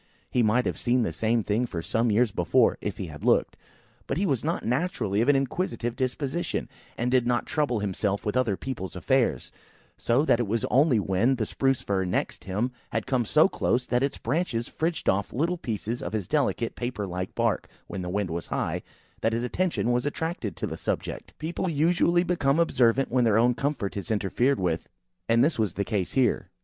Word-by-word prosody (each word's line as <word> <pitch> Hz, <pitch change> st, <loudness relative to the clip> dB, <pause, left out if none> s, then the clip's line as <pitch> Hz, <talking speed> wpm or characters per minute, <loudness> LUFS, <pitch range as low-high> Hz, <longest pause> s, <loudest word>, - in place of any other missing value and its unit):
He 125 Hz, -, +2 dB
might 115 Hz, +3 st, +3 dB
have -, -, -2 dB
seen 125 Hz, 0 st, +2 dB
the -, -, -2 dB
same 115 Hz, 0 st, +1 dB
thing 110 Hz, +5 st, 0 dB
for 85 Hz, -7 st, -5 dB
some 115 Hz, +6 st, +1 dB
years 110 Hz, +1 st, +3 dB
before, 95 Hz, +8 st, +2 dB
if 105 Hz, -1 st, -3 dB
he 95 Hz, -, -4 dB
had 75 Hz, -3 st, -9 dB
looked; -, -, +3 dB, 0.5 s
but 135 Hz, -, -1 dB
he 195 Hz, -, +1 dB
was 135 Hz, -, 0 dB
not 165 Hz, +3 st, -1 dB
naturally 120 Hz, -, 0 dB
of 120 Hz, -, +2 dB
an 145 Hz, -, +6 dB
inquisitive 135 Hz, -3 st, -1 dB
disposition, 135 Hz, +6 st, -2 dB, 0.3 s
and 120 Hz, +1 st, 0 dB
did 125 Hz, -2 st, +3 dB
not 120 Hz, -1 st, +1 dB
trouble 145 Hz, -7 st, 0 dB
himself 100 Hz, 0 st, -1 dB
with 105 Hz, -, -1 dB
other 115 Hz, -7 st, +1 dB
people's 115 Hz, -10 st, -5 dB
affairs: 90 Hz, -, +1 dB, 0.5 s
so 130 Hz, +6 st, +2 dB
that 120 Hz, -, +3 dB
it 120 Hz, -, 0 dB
was 110 Hz, +2 st, 0 dB
only 135 Hz, -3 st, +4 dB
when 100 Hz, +7 st, +2 dB
the 115 Hz, -3 st, -1 dB
Spruce 135 Hz, +3 st, 0 dB
fir 95 Hz, -2 st, 0 dB
next 90 Hz, 0 st, -2 dB
him 105 Hz, +7 st, -1 dB, 0.2 s
had 115 Hz, -, -2 dB
come 130 Hz, -3 st, +1 dB
so 155 Hz, -, +5 dB
close 125 Hz, -9 st, 0 dB
that 125 Hz, 0 st, +1 dB
its 140 Hz, 0 st, 0 dB
branches 125 Hz, -3 st, -1 dB
fridged 165 Hz, +1 st, -2 dB
off 100 Hz, +1 st, +1 dB
little 170 Hz, +6 st, 0 dB
pieces 115 Hz, -1 st, -3 dB
of 85 Hz, -, -5 dB
his 105 Hz, -4 st, -2 dB
delicate 135 Hz, -5 st, 0 dB
paper 120 Hz, -4 st, -3 dB
like 90 Hz, 0 st, -5 dB
bark, -, -, 0 dB, 0.2 s
when 95 Hz, -, -5 dB
the 90 Hz, -, -4 dB
wind 100 Hz, -1 st, -1 dB
was 85 Hz, 0 st, -4 dB
high, -, -, -2 dB, 0.4 s
that 115 Hz, -, +1 dB
his 115 Hz, +1 st, -1 dB
attention 140 Hz, -1 st, 0 dB
was 120 Hz, 0 st, +1 dB
attracted 145 Hz, -, -3 dB
to -, -, -2 dB
the -, -, -5 dB
subject. -, -, -4 dB
People 170 Hz, +4 st, -2 dB
usually 170 Hz, +3 st, +3 dB
become 160 Hz, -6 st, +1 dB
observant 135 Hz, -5 st, +3 dB
when 125 Hz, 0 st, +3 dB
their 110 Hz, -2 st, +4 dB
own 120 Hz, +2 st, +4 dB
comfort 130 Hz, -6 st, -2 dB
is 100 Hz, +3 st, -5 dB
interfered 115 Hz, +6 st, +1 dB
with, 85 Hz, -3 st, -1 dB, 0.4 s
and 115 Hz, +1 st, +5 dB
this 155 Hz, -4 st, +1 dB
was 105 Hz, -6 st, 0 dB
the 100 Hz, -, -1 dB
case 95 Hz, -3 st, -2 dB
here. 130 Hz, -2 st, +1 dB
120 Hz, 205 wpm, -27 LUFS, 105-135 Hz, 0.5 s, an